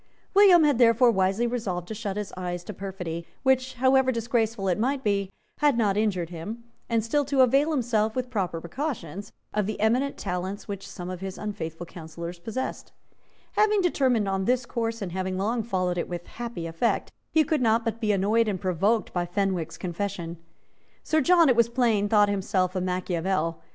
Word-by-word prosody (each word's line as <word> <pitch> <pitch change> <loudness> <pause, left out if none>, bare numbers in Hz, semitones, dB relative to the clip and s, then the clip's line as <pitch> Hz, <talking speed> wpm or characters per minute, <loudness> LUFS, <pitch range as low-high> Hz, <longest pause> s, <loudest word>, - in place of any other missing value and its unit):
William 385 -4 +7
had 290 -5 +3
therefore 235 0 +6
wisely 195 +3 +1
resolved 200 -8 -2
to - - -5
shut 205 -2 -4
his 210 -2 -4
eyes 175 -1 -4
to 210 - -7
perfidy, 180 -3 -6 0.2
which, 260 -1 +2
however 260 +1 +4
disgraceful 230 -3 -1
it 180 +1 +1
might 265 +4 0
be, 200 -3 0 0.3
had 290 -5 +3
not 205 -4 +2
injured 190 -5 0
him, 205 +8 -6 0.3
and 230 -2 +1
still 290 +6 +1
to 275 -1 +2
avail 275 +4 +4
himself, 230 -7 +1
with 255 -1 -3
proper 185 -7 -1
precautions, 200 - -5 0.2
of 210 -2 0
the 215 - -4
eminent 250 +6 +1
talents 185 +3 -4
which 200 -1 -6
some 180 0 -7
of 180 - -6
his 190 0 -5
unfaithful 175 -5 -5
counsellors 170 +1 -8
possessed, 225 +8 -5 0.6
Having 420 0 +3
determined 260 - +2
on 195 0 -1
this 250 +1 +1
course, 230 -2 -3
and 180 - -5
having 185 +1 -2
long 225 +5 0
followed 185 -5 -1
it - - -3
with 175 -1 -5
happy 235 -8 -6
effect, 165 +8 -1 0.2
he 315 - +4
could 300 -1 0
not 225 0 +2
but 230 +1 -2
be 215 -2 +2
annoyed 210 +4 +2
and 195 -3 -1
provoked 195 +4 0
by 175 -1 -1
Fenwick's 180 -3 -1
confession. 175 -2 -4 0.7
Sir 315 0 +2
John, 340 +2 +5
it 255 - +4
was 235 0 +4
plain, 230 -4 +2
thought 210 -1 +5
himself 190 -2 0
a 185 - 0
Machiavel. 180 -2 -1
210 Hz, 185 wpm, -26 LUFS, 185-240 Hz, 0.7 s, William